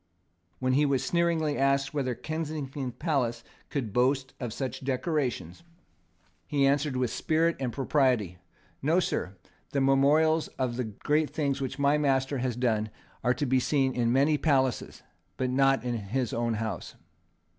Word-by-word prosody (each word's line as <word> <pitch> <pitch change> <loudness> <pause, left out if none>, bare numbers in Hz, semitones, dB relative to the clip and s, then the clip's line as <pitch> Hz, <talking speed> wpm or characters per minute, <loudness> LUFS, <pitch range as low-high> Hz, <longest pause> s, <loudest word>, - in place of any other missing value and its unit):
When 130 0 0
he 145 +3 +4
was 140 -3 +1
sneeringly 170 -3 +1
asked 140 0 +2
whether 130 -4 -1
Kensington 150 -4 -4
Palace 120 -5 -1 0.3
could 125 -9 -3
boast 130 +2 +1
of 120 -3 -4
such 130 +2 -4
decorations, 130 - -2 0.9
he 140 -2 +2
answered, 140 -1 +1
with 125 -2 0
spirit 165 +1 +1
and 130 -3 -2
propriety: 125 - +1 0.4
"No, 160 +6 +3
Sir. 95 - -2 0.4
The 140 - +2
memorials 150 +4 +3
of 125 -2 -1
the 125 - -1
great 150 +8 0
things 140 -3 -1
which 135 0 -3
my 140 +1 +3
master 135 -1 +1
has 125 -2 -1
done 110 -3 0 0.3
are 125 0 +2
to 145 - -1
be 130 0 +3
seen 135 0 +1
in 120 -1 +1
many 140 +4 +3
places; 135 -5 0 0.3
but 130 -1 -1
not 135 -2 +3
in 125 -1 -2
his 115 +2 -2
own 115 -1 0
house." 110 -5 -4
135 Hz, 155 wpm, -28 LUFS, 125-145 Hz, 0.9 s, he